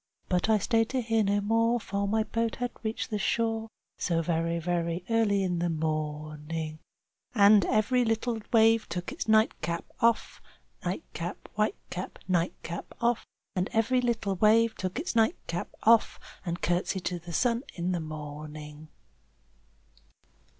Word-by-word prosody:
But 180 +3 +1
I 220 - +5
stayed 225 +2 +1
to 260 -1 0
hear 225 -1 +2
no 205 +1 +2
more, 230 +3 +2
for 200 -1 -2
my 220 +2 +2
boat 230 +1 -1
had 245 -1 -2
reached 220 +1 -3
the 210 - -1
shore, 225 +2 0 0.3
So 165 -2 +1
very, 165 0 0
very 170 +1 -1
early 210 -3 +3
in 180 -2 0
the 175 0 0
morning. 155 0 -3
Chorus - - -48 0.2
And 205 -1 +7
every 215 +4 +2
little 225 0 0
wave 225 -1 +4
took 180 +6 -4
its 315 -1 -5
nightcap 195 -6 +2
off, 230 0 +1 0.4
Its - - -28
nightcap, 175 0 -5
white 215 +1 +1 0.2
cap, 180 +1 -5
nightcap 170 -1 -2
off. 235 0 +1 0.3
And 185 +1 0
every 245 +3 +3
little 220 -5 0
wave 220 +3 +5
took 185 -1 -4
its 320 -1 -3
nightcap 220 -6 0
off, 230 0 +4 0.3
And 170 +1 -3
courtesied 175 +1 0
to 175 -1 -1
the 170 +1 -9
sun 235 +6 +2
in 180 +1 -1
the 175 - 0
morning. 150 0 -8
200 Hz, 150 wpm, -29 LUFS, 170-225 Hz, 0.4 s, And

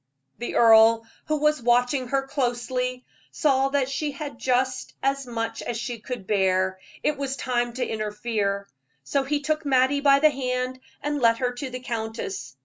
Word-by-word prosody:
The 240 - -4
earl, 225 0 +6 0.2
who 310 - 0
was 300 -1 +2
watching 245 +2 +2
her 270 +2 0
closely, 250 -1 -2 0.3
saw 270 -3 +2
that 275 -2 +1
she 285 +2 -2
had 285 -3 -7
just 255 0 0
as 275 -1 0
much 230 -1 -3
as 240 - -3
she 240 0 -4
could 240 -2 -6
bear 190 -2 +1 0.2
it 300 -2 0
was 275 -1 -2
time 240 -2 -1
to 255 +1 -2
interfere; 210 -2 -2 0.4
so 275 - 0
he 290 +2 -1
took 310 +1 -1
Mattie 270 0 +3
by 280 -1 +6
the 305 +2 +5
hand 255 -1 -2 0.2
and 295 -1 -1
led 230 -1 +4
her 250 -1 0
to 265 +2 -5
the 255 0 -6
countess. 220 - -5
250 Hz, 170 wpm, -25 LUFS, 230-275 Hz, 0.4 s, earl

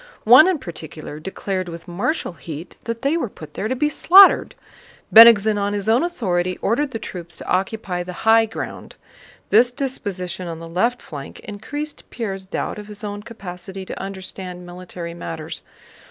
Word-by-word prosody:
One 250 +9 +8
in 375 -3 +2
particular 155 - -8
declared 185 +1 -4
with 170 0 -9
martial 185 - -2
heat 165 0 -9
that 230 +1 -4
they 285 +4 +2
were 250 -9 -2
put 155 -5 -12
there 210 - -3
to 260 - -1
be 300 +4 +1
slaughtered. 375 +6 +6 0.6
Bennigsen 220 -2 +8
on 200 0 -1
his 205 -1 -3
own 230 +4 +4
authority 185 - -1
ordered 270 +7 0
the 230 - -4
troops 175 -6 -7
to - - -6
occupy 190 -1 -1
the 180 +1 -6
high 225 0 +6
ground. 220 - -7 0.6
This 235 +3 +6
disposition 200 -9 -4
on 165 -1 -5
the 165 +1 -9
left 225 +9 0
flank 140 -3 -9
increased 290 +9 -7
Pierre's 195 -5 -5
doubt 195 - -3
of 210 - -9
his 210 0 -8
own 205 0 -5
capacity 190 -4 -8
to - - -6
understand 190 -2 -7
military 175 -1 -8
matters. 165 -2 -6
195 Hz, 170 wpm, -21 LUFS, 175-230 Hz, 0.6 s, One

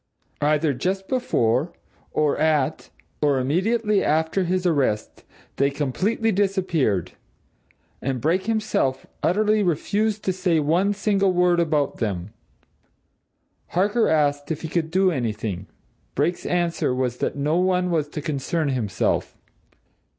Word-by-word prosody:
Either 150 0 +2
just 190 +9 -2
before, 150 - +1 0.4
or 150 -2 +1
at, 155 -1 +1 0.3
or 145 -2 +3
immediately 205 - +1
after 160 +5 +1
his 185 +1 -1
arrest 140 -11 0 0.3
they 140 0 +3
completely 185 - 0
disappeared 185 - 0 0.9
and 130 -1 -2
Brake 175 - 0
himself 215 -12 0 0.2
utterly 210 +3 +2
refused 205 +5 0
to 190 - 0
say 180 -3 +1
one 175 +7 +2
single 195 -1 +2
word 180 -1 +3
about 155 -4 +1
them. 100 -2 -3 1.3
Harker 205 +6 +1
asked 145 -2 +1
if 160 -1 -3
he - - -2
could 160 0 -1
do 185 +2 +3
anything 110 - -3 0.5
Brake's 160 +6 0
answer 170 -7 0
was 125 -1 -1
that - - -2
no 150 +3 0
one 180 0 +1
was 155 -3 +1
to 150 - -5
concern 150 +1 -1
himself. 115 -7 -1
160 Hz, 125 wpm, -23 LUFS, 140-190 Hz, 1.3 s, or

